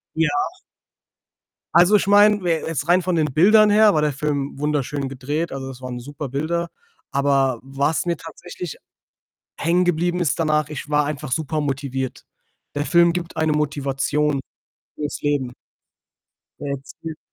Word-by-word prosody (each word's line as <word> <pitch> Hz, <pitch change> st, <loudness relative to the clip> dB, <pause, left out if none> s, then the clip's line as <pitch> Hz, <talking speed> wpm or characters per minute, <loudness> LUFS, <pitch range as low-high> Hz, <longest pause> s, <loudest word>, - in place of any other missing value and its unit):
Ja. 160 Hz, -1 st, +2 dB, 1.5 s
Also, 180 Hz, +5 st, +6 dB
ich 195 Hz, -, 0 dB
meine, 205 Hz, 0 st, +5 dB
we 175 Hz, -, 0 dB, 0.2 s
jetzt 155 Hz, -1 st, -3 dB
rein 180 Hz, +1 st, +4 dB
von 180 Hz, 0 st, -1 dB
den 155 Hz, -2 st, +2 dB
Bildern 210 Hz, +7 st, +6 dB
her 210 Hz, 0 st, +6 dB
war 155 Hz, -, +2 dB
der 150 Hz, -1 st, +1 dB
Film 140 Hz, -1 st, -2 dB
wunderschön 145 Hz, -2 st, -1 dB
gedreht, 145 Hz, +5 st, -3 dB
also, 135 Hz, -1 st, -5 dB
es 130 Hz, -1 st, -11 dB
waren 125 Hz, -1 st, -5 dB
super 145 Hz, +2 st, -7 dB
Bilder. 165 Hz, +5 st, -2 dB, 0.4 s
Aber 135 Hz, -3 st, +1 dB
was 140 Hz, +5 st, -1 dB
mir 170 Hz, -, 0 dB
tatsächlich 175 Hz, +1 st, -8 dB, 0.8 s
hängen 175 Hz, +3 st, +2 dB
geblieben 175 Hz, +1 st, +1 dB
ist 165 Hz, -4 st, 0 dB
danach, 155 Hz, -2 st, +1 dB
ich 150 Hz, 0 st, -7 dB
war 150 Hz, -1 st, +2 dB
einfach 145 Hz, -2 st, -5 dB
super 155 Hz, 0 st, -1 dB
motiviert. 135 Hz, -2 st, -3 dB, 0.5 s
Der 145 Hz, +1 st, -1 dB
Film 170 Hz, -1 st, +4 dB
gibt 175 Hz, -2 st, -5 dB
eine 160 Hz, -1 st, +2 dB
Motivation 145 Hz, 0 st, 0 dB, 0.6 s
fürs 150 Hz, -1 st, -4 dB
Leben. 140 Hz, -4 st, 0 dB, 1.1 s
Er 145 Hz, -, -4 dB
erzählt 155 Hz, +3 st, -8 dB
150 Hz, 150 wpm, -22 LUFS, 140-170 Hz, 1.5 s, Also